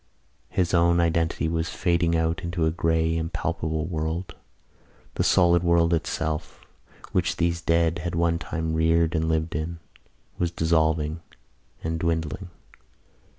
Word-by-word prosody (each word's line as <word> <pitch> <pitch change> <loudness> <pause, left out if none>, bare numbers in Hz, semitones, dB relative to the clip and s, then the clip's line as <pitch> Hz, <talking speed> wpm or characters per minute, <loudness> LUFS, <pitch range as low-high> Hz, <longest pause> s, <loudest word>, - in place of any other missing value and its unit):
His 90 -1 0
own 85 0 +4
identity 85 -1 +1
was 80 +1 -1
fading 85 -2 +1
out 80 +2 0
into 85 -1 -1
a 80 - +2
grey 80 0 +1
impalpable 80 -1 -2
world: 80 +2 -3 0.8
the - - 0
solid 85 -2 +4
world 85 -1 +3
itself 80 -1 -2 0.5
which - - +1
these 85 0 0
dead 85 0 +2
had 85 +1 -3
one 85 0 +1
time 80 -1 -3
reared 80 +1 +2
and 80 -1 0
lived 80 0 0
in 80 +3 -3 0.6
was 85 - +1
dissolving 80 -1 +1 0.6
and 80 0 -2
dwindling. 80 +2 -2
80 Hz, 130 wpm, -25 LUFS, 80-85 Hz, 0.8 s, own